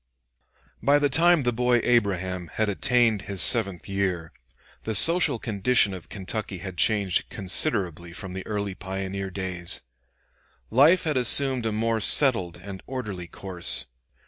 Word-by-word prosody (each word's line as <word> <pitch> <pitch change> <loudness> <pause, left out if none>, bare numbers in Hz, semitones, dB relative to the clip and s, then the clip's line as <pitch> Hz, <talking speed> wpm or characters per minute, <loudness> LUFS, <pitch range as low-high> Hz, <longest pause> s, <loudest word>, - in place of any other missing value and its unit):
] - - -48 0.3
By 140 +1 +3
the 145 -1 0
time 170 +1 +3
the 120 -1 -1
boy 125 +1 +1
Abraham 95 -6 -1
had 110 -1 0
attained 120 -1 +1
his 100 -2 -4
seventh 100 -7 +2
year, 95 -5 -3 0.5
the 110 - -4
social 165 - +5
condition 110 -2 0
of 90 -2 -11
Kentucky 100 0 -6
had 90 0 -9
changed 100 -4 0
considerably 90 - 0
from 95 +1 -8
the 95 0 -7
early 100 -2 -4
pioneer 95 +1 -6
days. 90 -2 -3 0.9
Life 150 +11 +4
had 155 -5 -2
assumed 130 -1 +4
a - - -2
more 115 +1 -1
settled 100 - +3
and 95 +1 -10
orderly 105 -9 -6
course. 90 0 0
100 Hz, 145 wpm, -24 LUFS, 95-125 Hz, 0.9 s, social